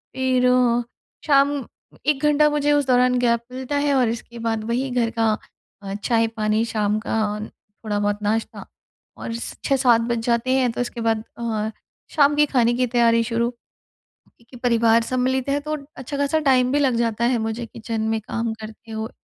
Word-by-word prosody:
फ़िर 255 -1 +2 0.8
शाम 280 -1 +4 0.5
1 290 -1 +1
घंटा 300 0 +4
मुझे 295 0 +1
उस 290 -1 +2
दौरान 250 0 +3
गैप 235 -1 +2
मिलता 260 +2 -4
है 285 0 +1
और 250 -4 +3
इसके 235 +1 -6
बाद 225 -1 -2
वही 255 +3 -1
घर 240 -2 +1
का, 225 -2 +1 0.5
अ, 195 0 -5
चाय 230 -2 +2
पानी 215 0 +1
शाम 210 -2 0
का, - - -2 0.7
थोड़ा 205 -1 -1
बहुत 205 0 0
नाश्ता 220 +2 -2 0.5
और 230 - -5
स 235 - -5
6-7 255 -4 +4
बज 235 0 -1
जाते 235 +1 +1
हैं। 255 -2 +2
तो 230 - -3
इसके 240 -1 -4
बाद 225 -1 0 0.2
अ, 220 -2 -2 0.5
शाम 290 -1 +4
के 295 0 +4
खाने 240 -4 +2
की 250 +1 +1
तैयारी 230 -1 +3
शुरू 235 +1 0 0.6
क्योंकि 235 +2 -21
परिवार 230 -1 +4
सम्मिलित 255 +2 -1
है, 280 +1 +1
तो 305 +1 -3 0.2
अच्छा 275 +2 -5
ख़ासा 285 +3 +1
टाइम 255 -1 +3
भी 290 - +2
लग 265 -4 +2
जाता 230 0 0
है, 245 0 +2
मुझे 225 +2 -3
किचन 225 0 -5
में 225 0 0
काम 230 +1 -3
करते 220 +1 -10
हो। 220 +1 -4
235 Hz, 180 wpm, -22 LUFS, 225-260 Hz, 0.8 s, शाम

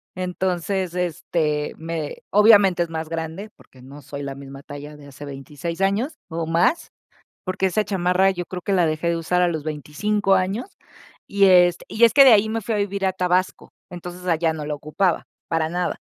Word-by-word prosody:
Entonces, 185 0 -2
este, 165 -4 -1
me 160 -2 -5
obviamente 205 -4 +5
es 170 - -7
más 160 -1 -4
grande 165 +5 -5
porque 130 - -20
no 140 +3 -12
soy 140 +1 -7
la 140 -1 -5
misma 135 0 -11
talla 145 +1 -9
de 145 -1 -14
hace 140 +1 -11
26 145 +5 -7
años, 215 +11 0
o 165 -1 -4
más. 170 - +1 0.6
Porque 185 0 -1
esa 200 +3 0
chamarra 185 -1 +2
yo 180 -2 -4
creo 180 0 -7
que 200 - -2
la 180 -3 +3
dejé 155 +2 -1
de 170 - 0
usar 180 +2 0
a 180 - +3
los 160 -3 -3
25 160 +7 0
años, 190 - -1 0.6
y 200 0 +3
este 180 -2 +5
y 225 +2 +3
es 230 - +5
que 275 - +9
de 260 - +8
ahí 215 0 +4
me 225 +1 -2
fui 220 +2 -2
a - - 0
vivir 200 -1 -1
a 190 - +1
Tabasco. 185 0 -1 0.2
Entonces 180 +1 -9
allá 165 -1 +1
no 155 -1 -6
la 150 - -2
ocupaba, 155 +5 -1 0.2
para 165 -1 0
nada. 180 +2 -2
175 Hz, 195 wpm, -22 LUFS, 155-195 Hz, 0.6 s, que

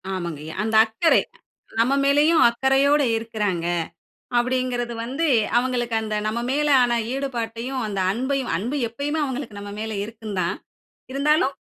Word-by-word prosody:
ஆமங்கய்யா. 160 -4 -5
அந்த 220 0 -1
அக்கறை, 225 +10 +3 0.6
நம்ம 240 +4 +3
மேலயும் 295 +4 +4
அக்கறையோடு 270 +4 +3
இருக்குறாங்க. 210 -6 -2 0.7
அப்படிங்குறது 245 -1 -1
வந்து 275 +8 -1 0.3
அவங்களுக்கு 245 -2 -1
அந்த 215 -1 -4
நம்ம 215 +2 -1
மேல 295 +2 +1
ஆன 240 -1 +2 0.2
ஈடுபாட்டையும், 250 -1 -3
அந்த 200 -2 -3
அன்பையும் 260 +1 -1
அன்பு 240 - -2
எப்பயுமே 290 +7 -3
அவங்களுக்கு 260 -6 -5
நம்ம 205 0 -7
மேல 220 0 -4
இருக்குந்தான். 210 -5 -3 0.6
இருந்தாலும், 280 0 +2
240 Hz, 125 wpm, -23 LUFS, 220-275 Hz, 0.7 s, மேலயும்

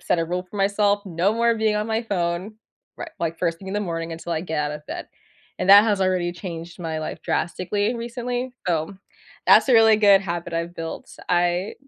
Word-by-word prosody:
set 175 - 0
a 165 - +1
rule 180 +2 -2
for 185 +3 -12
myself. 200 +1 +1
No 180 +3 +1
more 235 0 +2
being 220 -1 +1
on 210 +1 -1
my 225 +1 -1
phone, 185 0 -2 0.4
ri - - -5
like, 165 -1 -2
first 165 -2 -1
thing 190 - -10
in 195 - -4
the 210 - 0
morning 165 -3 -4
until 165 +1 -5
I 160 0 -2
get 160 -4 -3
out 150 0 -2
of 150 0 -9
bed - - -6 0.5
and 190 - +2
that 205 +2 +10
has 205 -3 +1
already 180 -2 0
changed 170 -1 -8
my 160 -2 -3
life 155 - -6
drastically 205 +6 -1
recently. 245 +1 -4
So, 170 +2 -1 0.5
that's - - +7
a - - +4
really 225 -1 +6
good 200 -2 +6
habit 170 -2 -4
I've 170 +1 -3
built. 165 0 -7
I 175 +2 +1
185 Hz, 210 wpm, -23 LUFS, 170-210 Hz, 0.5 s, that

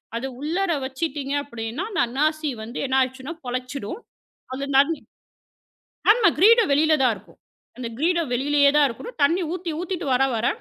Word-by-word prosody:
அத 235 +3 -3
உள்ளற 340 +6 -1
வச்சிட்டீங்க 275 0 -3
அப்படின்னா, 235 +2 -5
அந்த 345 -4 +1
அன்னாசி 305 +5 0
வந்து 235 +3 -7
என்ன 265 0 +1
ஆயிடுச்சுன்னா, 260 +4 -2
பொழைச்சிடும். 255 - -4 0.5
அது 270 +2 -4
நன் 285 +4 +5 1.2
ஆமா. 440 0 +5
கிரீடம் 455 -1 +6
வெளில 310 +2 +4
தான் 250 -3 +4
இருக்கும். - - -18 0.4
அந்த 250 -2 -5
கிரீடம் 335 -1 +1
வெளியிலேயே 285 +2 +3
தான் 295 -1 +6
இருக்கணும். 270 - -8
தண்ணி 335 +6 +3
ஊத்தி 360 -1 -4
ஊத்திட்டு 360 -2 -4
வர, 250 - +3
வர, 225 +2 0
285 Hz, 155 wpm, -23 LUFS, 260-335 Hz, 1.2 s, கிரீடம்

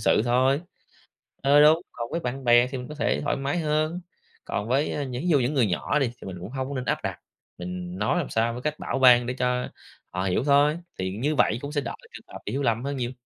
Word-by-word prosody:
sự - - +3
thôi. 130 +4 +3 0.8
Ờ, 145 +2 +6
đúng. 155 +3 +6
Còn 120 0 -6
với 170 - -1
bạn 130 -2 -4
bè 120 0 +5
thì 130 0 -5
mình 125 - -7
có 150 - -8
thể 150 - 0
thoải - - 0
mái 140 +4 -2
hơn, 155 +3 0 0.4
còn 105 +2 -3
với 140 +2 0
những 125 0 -5
ví - - -2
dụ 150 -5 +4
những 130 +4 0
người 130 -5 +3
nhỏ 100 +11 0
đi 135 - +2
thì - - -8
mình 90 -2 -6
cũng 90 - -7
hông 130 0 -4
có 140 - -5
nên 130 -1 -3
áp - - +1
đặt, - - -3 0.4
mình 90 0 -6
nói 105 +12 +1
làm 165 - -3
sao 115 +1 +1
với 125 - -6
cách 150 +1 -3
bảo - - -2
ban 125 -2 +7
để 125 - -2
cho 125 0 -1 0.4
họ 90 +1 -3
hiểu 95 +5 0
thôi. 145 +3 +3 0.2
Thì 95 +2 -3
như 150 +6 0
vậy 115 -3 +3
cũng 145 +1 -5
sẽ 145 -2 0
đỡ 120 - -5 0.2
trường - - -11
hợp - - -7
hiểu 135 +7 -2
lầm 115 -2 +1
hơn 140 +1 -3
nhiều. 120 0 -2
130 Hz, 260 wpm, -25 LUFS, 120-145 Hz, 0.8 s, ban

